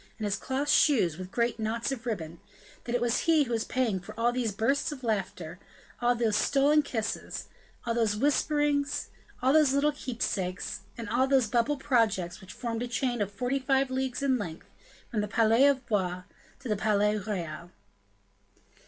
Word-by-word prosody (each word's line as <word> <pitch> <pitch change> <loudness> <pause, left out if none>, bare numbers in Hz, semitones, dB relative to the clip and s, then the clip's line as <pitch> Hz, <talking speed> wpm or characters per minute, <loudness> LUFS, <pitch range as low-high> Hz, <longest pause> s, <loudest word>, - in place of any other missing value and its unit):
and 215 - -4
his 200 -1 0
cloth 265 +7 -2
shoes 220 - +3
with 185 0 -6
great 235 +2 0
knots 230 +4 -1
of 245 -3 -5
ribbon, 170 -7 -4 0.5
that 240 0 -2
it 245 - 0
was 240 -1 +2
he 315 -2 +5
who 250 - -6
was 225 -1 0
paying 235 -7 0
for 195 +4 -11
all 240 +1 +2
those 245 -3 -1
bursts 230 +10 0
of 270 -3 -8
laughter, 185 -6 -3 0.4
all 245 0 +3
those 230 -3 +1
stolen 285 +5 +4
kisses, 225 -6 -4 0.4
all 235 - 0
those 225 -3 +1
whisperings, 290 +2 +1 0.3
all 260 +2 +4
those 305 -3 +5
little 285 +2 +3
keepsakes, 215 -9 -3 0.2
and 230 -1 -6
all 255 +3 +2
those 265 -3 +4
bubble 240 +6 +1
projects 215 -10 +1
which 190 - -11
formed 230 -2 -4
a 245 - -2
chain 245 -1 -1
of 205 -1 -1
forty 250 +6 -1
five 270 0 +1
leagues 260 0 -2
in 260 -3 +2
length, 165 -6 -6 0.5
from 215 - 0
the 210 - -2
palais 225 +5 +4
of 270 -3 +1
Blois 185 -4 -1 0.4
to 270 - -8
the 210 - +1
Palais 210 0 +2
Royal. 175 -5 -5
235 Hz, 180 wpm, -29 LUFS, 210-265 Hz, 0.5 s, he